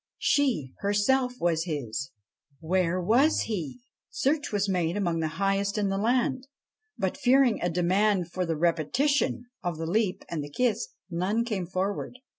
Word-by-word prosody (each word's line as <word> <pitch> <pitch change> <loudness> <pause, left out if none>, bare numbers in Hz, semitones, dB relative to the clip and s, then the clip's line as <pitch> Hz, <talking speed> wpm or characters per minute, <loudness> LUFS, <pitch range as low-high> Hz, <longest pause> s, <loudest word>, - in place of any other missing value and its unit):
She, 240 - +1
herself, 245 +6 +2
was 165 -1 +1
his; 135 -5 -3 0.5
where 180 +2 +1
was 240 - +3
he? 200 - -4 0.3
Search 290 +2 0
was 205 -1 0
made 180 -2 0
among 170 -5 0
the 160 - 0
highest 195 +1 0
in 205 -2 +1
the 195 - -1
land, 255 +4 +1 0.5
but, 190 +3 -1
fearing 260 -3 +4
a 175 - +1
demand 180 +1 +1
for 185 - -1
the 165 -3 -2
repetition 240 - +1 0.2
of 175 -3 -3
the 165 - -3
leap 195 +2 0
and 160 -3 -3
the 145 - -7
kiss, 220 - 0 0.2
none 195 +7 0
came 200 -7 -2
forward. 190 +6 -3
195 Hz, 155 wpm, -27 LUFS, 170-235 Hz, 0.5 s, fearing